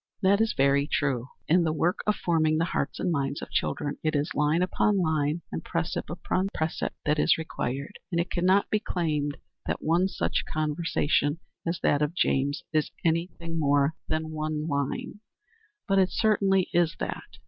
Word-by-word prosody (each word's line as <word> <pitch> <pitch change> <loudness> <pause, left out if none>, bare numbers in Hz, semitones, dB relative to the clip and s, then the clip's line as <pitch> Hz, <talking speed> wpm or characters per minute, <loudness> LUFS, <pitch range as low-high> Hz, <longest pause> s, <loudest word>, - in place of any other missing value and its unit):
That 200 +2 +4
is 225 -1 +2
very 140 +1 +3
true. 130 -5 0 0.2
In 175 +2 +4
the 160 - +1
work 165 +3 +1
of 210 - +3
forming 155 -2 +2
the 165 - +2
hearts 140 -5 -2
and 180 - 0
minds 140 -2 -1
of - - -8
children 145 -2 -1
it 155 0 +1
is 145 +5 0
"line 150 +4 +2
upon 200 +2 +2
line, 160 -1 0
and - - -4
precept 165 -1 -2
upon 185 +2 -1
precept" 160 0 -2
that 150 0 +2
is 165 - +4
required; 140 0 -4
and 170 - +1
it 170 +1 -1
can 175 - -1
not 190 +2 +4
be 215 - +3
claimed 150 -8 -1 0.3
that - - -2
one 170 +4 +3
such - - -1
conversation 155 -1 +1 0.3
as 170 +1 -1
that 145 - +3
of 150 +3 0
James 145 -4 +1
is 155 -1 +2 0.2
any 165 +1 +2
thing 165 -1 -4
more 145 0 +3
than 155 0 -2
one 155 0 -2
line. 140 +6 -2 0.7
But 195 0 +3
it 185 -1 +4
certainly 195 -4 +2
is 170 -2 +2
that. - - -6
160 Hz, 180 wpm, -27 LUFS, 145-175 Hz, 0.7 s, That